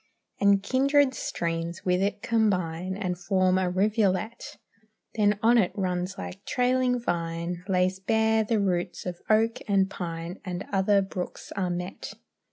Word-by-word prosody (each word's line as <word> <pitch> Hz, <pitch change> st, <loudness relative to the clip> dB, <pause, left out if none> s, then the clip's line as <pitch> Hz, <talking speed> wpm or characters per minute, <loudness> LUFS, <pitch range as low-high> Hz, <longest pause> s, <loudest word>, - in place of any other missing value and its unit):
And 200 Hz, -1 st, +4 dB
kindred 275 Hz, +2 st, +3 dB
streams 170 Hz, -5 st, -3 dB
with 180 Hz, 0 st, +2 dB
it 205 Hz, +1 st, -1 dB
combine 185 Hz, -5 st, 0 dB
And 180 Hz, -4 st, -3 dB
form 185 Hz, 0 st, +2 dB
a 185 Hz, -1 st, +1 dB
rivulet; 210 Hz, +3 st, 0 dB, 0.6 s
Then 205 Hz, -2 st, +2 dB
on 235 Hz, +1 st, +6 dB
it 185 Hz, -, +2 dB
runs 185 Hz, -1 st, -2 dB
like 195 Hz, +2 st, -7 dB
trailing 250 Hz, 0 st, +1 dB
vine, 170 Hz, -3 st, -3 dB
Lays 185 Hz, 0 st, +1 dB
bare 220 Hz, +2 st, +2 dB
the 215 Hz, 0 st, 0 dB
roots 180 Hz, -2 st, -1 dB
of 175 Hz, -1 st, -5 dB
oak 225 Hz, +1 st, +3 dB
and 195 Hz, -1 st, +2 dB
pine, 170 Hz, 0 st, -5 dB
And 185 Hz, -1 st, -5 dB
other 195 Hz, +1 st, +3 dB
brooks 185 Hz, -1 st, -6 dB
are 190 Hz, -3 st, -1 dB
met. 180 Hz, +1 st, -5 dB
190 Hz, 145 wpm, -27 LUFS, 180-215 Hz, 0.6 s, on